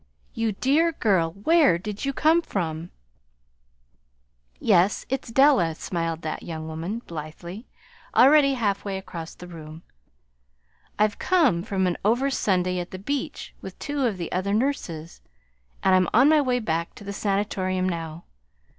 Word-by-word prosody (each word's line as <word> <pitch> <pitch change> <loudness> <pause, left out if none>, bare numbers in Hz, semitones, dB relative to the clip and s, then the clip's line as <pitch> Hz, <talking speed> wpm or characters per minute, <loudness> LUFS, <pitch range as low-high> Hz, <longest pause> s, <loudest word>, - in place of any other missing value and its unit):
"You 225 -2 -1
dear 305 +10 +2
girl, 190 - +2
where 280 - +4
did 210 +6 -5
you 275 - 0
come 315 +5 +3
from?" 165 - -3 1.7
"Yes, 180 +4 +3
it's 265 -2 -3
Della," 250 - +4
smiled 165 -1 -3
that 155 - -4
young 160 -1 -6
woman, 170 +9 -5
blithely, 170 +7 -8 0.5
already 275 +1 +6
halfway 200 -4 -1
across 170 -4 -8
the 180 - -11
room. 160 -2 -10 1.1
"I've 210 0 +1
come 305 - +3
from 190 -1 -1
an 180 -1 0
over 245 +7 +2
Sunday 180 -7 +1
at 175 - -5
the 185 - -7
beach 275 +9 -4
with - - -9
two 285 -3 -1
of 210 -5 -2
the 170 -2 -5
other 195 +3 0
nurses, 175 - -2 0.6
and 190 - +4
I'm 185 -1 +4
on 270 - +7
my 310 -1 +5
way 255 -3 +1
back 170 -7 -2
to - - -11
the 200 0 -5
Sanatorium 195 -2 -1
now. 165 -2 -4
195 Hz, 145 wpm, -25 LUFS, 170-250 Hz, 1.7 s, on